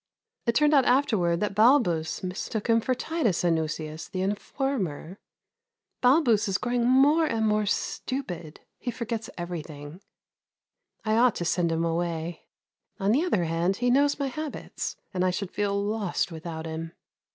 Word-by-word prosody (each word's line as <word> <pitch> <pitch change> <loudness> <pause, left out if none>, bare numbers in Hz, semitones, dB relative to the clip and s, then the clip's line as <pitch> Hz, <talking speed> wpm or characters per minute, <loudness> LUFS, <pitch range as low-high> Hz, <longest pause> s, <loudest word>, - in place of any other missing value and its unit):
It 235 - +2
turned 300 +3 +4
out 275 -3 +5
afterwards 210 -10 +2
that 210 -1 0
Balbus 210 - +3
mistook 190 +4 -3
him 230 0 +4
for 255 +3 0
Titus 250 - 0
Anuseius, 160 -1 -1
the 185 0 -2
informer. 200 - -3 0.8
Balbus 250 -5 +4
is 195 -1 +1
growing 245 -1 0
more 290 +5 +5
and 225 -5 0
more 210 -1 +1
stupid; 180 - -3 0.2
he 250 - -4
forgets 230 -2 -4
everything. 160 -2 -7 1.0
I 215 0 +2
ought 245 0 +4
to 175 - -3
send 170 0 +1
him 165 +1 0
away; 165 0 -3 0.5
on 195 +1 +2
the 275 +8 +3
other 215 - +1
hand, 170 +3 0
he 245 0 +1
knows 285 +2 +3
my 280 - -1
habits, 305 +2 -5 0.2
and 180 -1 0
I 185 - +3
should 185 +1 -3
feel 200 -1 0
lost 205 -3 -1
without 160 0 -6
him. 165 +1 -5
200 Hz, 150 wpm, -27 LUFS, 170-245 Hz, 1.0 s, out